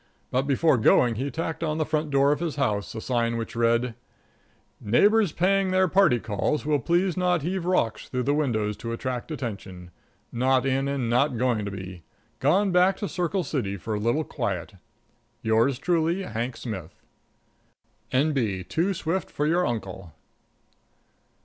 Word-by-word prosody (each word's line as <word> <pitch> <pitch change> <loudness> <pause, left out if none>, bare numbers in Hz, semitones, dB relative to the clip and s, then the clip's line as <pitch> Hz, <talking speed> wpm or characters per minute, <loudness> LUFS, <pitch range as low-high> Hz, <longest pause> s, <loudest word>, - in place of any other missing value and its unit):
But 130 +2 0
before 140 -1 +3
going 115 +2 +4
he 130 +6 -3
tacked 160 +3 -4
on 155 -1 -1
the 155 - 0
front 155 0 -1
door 140 0 +3
of 150 - 0
his 165 -3 -3
house 105 -9 -1
a 110 - -4
sign 115 -1 0
which 115 0 -5
read: 115 +1 +2 0.9
"Neighbors 205 - +3
paying 195 +3 +2
their 185 0 +3
party 185 -8 +4
calls 110 +7 -2
will 150 -1 +2
please 175 +7 +1
not 180 -4 +1
heave 180 +1 -2
rocks 145 -12 0
through 125 -1 -1
windows 110 -8 0
to 115 0 -5
attract 125 +2 -4
attention. 100 - -6 0.4
Not 130 +1 +2
in 135 +1 +1
and 140 -4 -1
not 125 +2 +2
going 120 -4 0
to - - -3
be. 95 -2 -8 0.4
Gone 185 +9 +3
back 180 +2 +4
to 205 - -3
Circle 180 0 -1
City 115 -10 -2
for 110 +4 -5
a 105 - -1
little 120 +9 +1
quiet. 100 - -4 0.7
"Yours 115 +4 +2
truly, 170 +4 0
"HANK 120 -2 -4
SMITH. 95 -8 -6 1.2
"N.B. 130 -9 +1
Too 180 - -1
swift 170 +2 -2
for 150 - -2
your 175 +3 +2
uncle." 95 -7 -5
135 Hz, 160 wpm, -25 LUFS, 115-165 Hz, 1.2 s, going